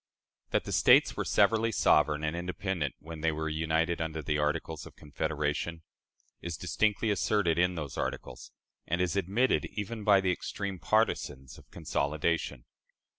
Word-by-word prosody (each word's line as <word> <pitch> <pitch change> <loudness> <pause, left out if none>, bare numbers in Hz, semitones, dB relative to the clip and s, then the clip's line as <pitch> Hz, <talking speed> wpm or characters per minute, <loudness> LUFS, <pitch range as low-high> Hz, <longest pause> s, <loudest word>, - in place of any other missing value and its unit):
That - - +1
the - - -6
States - - +5
were - - -1
severally 115 0 +3
sovereign 75 -7 +3
and 75 +1 -1
independent 90 -3 -3
when 80 0 -9
they 80 0 +2
were 80 0 -3
united 80 +2 0
under 80 -1 -3
the 75 +1 0
Articles 75 +1 -2
of - - -15
Confederation, 75 +2 -3 0.6
is 85 -3 -5
distinctly 105 +5 0
asserted 95 -4 +1
in 90 0 +2
those 75 -5 -5
articles, - - -5 0.4
and 85 +2 0
is 90 0 0
admitted 100 +7 +1
even 105 +1 -4
by 100 -2 +6
the 95 -1 +1
extreme 95 +1 -4
partisans 75 - 0
of - - -20
consolidation. 75 -3 -2
85 Hz, 150 wpm, -30 LUFS, 75-95 Hz, 0.6 s, by